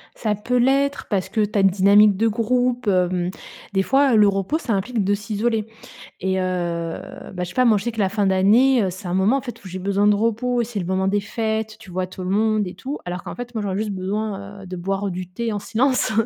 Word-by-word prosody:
Ça 215 -2 -1
peut 235 +5 -1
l'être 275 +3 +2
parce 195 -3 -1
que 220 - 0
tu 210 +1 -2
as - - +4
une 195 - +6
dynamique 200 +2 +5
de 225 +3 +2
groupe, 245 +2 0
hem, 180 -2 +1 0.4
des 195 - +2
fois, 270 +3 +3
heu, - - +5
le 210 -1 +6
repos, 195 +8 0
ça 250 -8 -2
implique 210 +3 -1
de 200 +2 +1
s'isoler 215 +2 -1 0.5
et 190 +1 0
heu, - - 0 0.9
bah, 180 -1 -3
je - - -2
sais - - -10
pas, 255 - +3
moi, 220 -3 +5
je 195 - -5
sais 240 - 0
que 220 - -8
la 195 -2 +2
fin 205 0 0
d'année, 215 +7 +4
heu, 190 - 0
c'est 185 +1 -8
un 175 - -2
moment, 195 +8 +3
en - - -3
fait, 245 -5 -9
où - - -9
j'ai 185 +1 -6
besoin 200 +2 +1
de 210 - +5
repos. 230 +3 0
C'est 225 -2 -4
le 180 - -3
moment 190 +1 0
des 205 +1 +1
fêtes. 220 +1 -3
Tu 220 -3 -14
vois 185 +1 -2
tout 185 0 -8
le 180 - -3
monde 215 0 +1
et 180 - -7
tout, 270 +11 -5
alors 180 0 -5
qu'en - - -7
fait, 245 0 -7
moi, 220 - -1
j'aurais 195 -2 -2
juste 215 0 -2
besoin, 200 +1 -4
heu, - - -10
de 185 - -6
boire 195 +3 -2
du 180 0 -5
thé 230 +5 -3
en 205 - -2
silence 250 +4 +1
205 Hz, 260 wpm, -22 LUFS, 190-230 Hz, 0.9 s, une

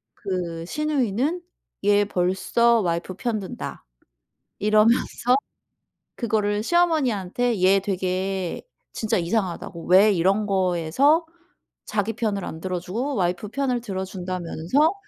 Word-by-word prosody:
그 175 -4 -4
시누이는 295 - 0 0.4
얘 205 0 +4
벌써 205 +6 +2
와이프 170 0 -2
편 225 +2 -2
든다 190 - -7 0.7
이러면서 225 +4 +3 0.8
그거를 210 -3 0
시어머니한테 245 - +1
얘 195 +1 +5
되게 190 -1 -2 0.3
진짜 220 -3 0
이상하다고. 175 -2 -2
왜 195 +4 +6
이런 195 +4 +2
거에서 190 - +2 0.6
자기 215 +1 -1
편을 210 -4 -2
안 160 - -6
들어주고 190 - -3
와이프 180 +2 -1
편을 250 0 -1
들어준다면서 185 - -1
200 Hz, 250 characters per minute, -24 LUFS, 185-235 Hz, 0.8 s, 왜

